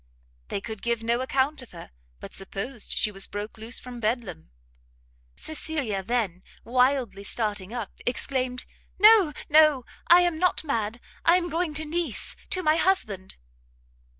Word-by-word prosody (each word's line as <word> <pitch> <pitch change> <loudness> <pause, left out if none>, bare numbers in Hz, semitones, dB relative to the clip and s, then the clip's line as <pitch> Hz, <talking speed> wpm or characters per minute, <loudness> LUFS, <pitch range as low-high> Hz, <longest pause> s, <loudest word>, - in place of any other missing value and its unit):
They 200 - -3
could 220 -1 -7
give 235 -1 -1
no 235 +2 +1
account 265 +2 0
of 255 - -14
her, 170 - -11 0.3
but - - -10
supposed 200 +5 -4
she 210 - +1
was 195 -1 -5
broke 210 +2 -6
loose 225 +2 -2
from 250 -1 -8
Bedlam. 215 - -3 0.9
Cecilia 290 - -3
then, 195 -4 -1 0.2
wildly 250 -4 +1
starting 205 -2 -1
up, 235 -4 -5 0.2
exclaimed, 255 0 0 0.3
"No, 420 -5 +7 0.2
no, 305 -4 +5 0.2
I 345 +1 +8
am 350 -3 0
not 360 -2 +2
mad, 230 -6 -2 0.2
I 340 - +6
am 350 -1 -2
going 330 -2 -1
to 315 +1 -2
Nice 320 -5 -2
to 370 - -1
my 310 0 +4
husband." 215 - 0
250 Hz, 150 wpm, -26 LUFS, 215-310 Hz, 0.9 s, I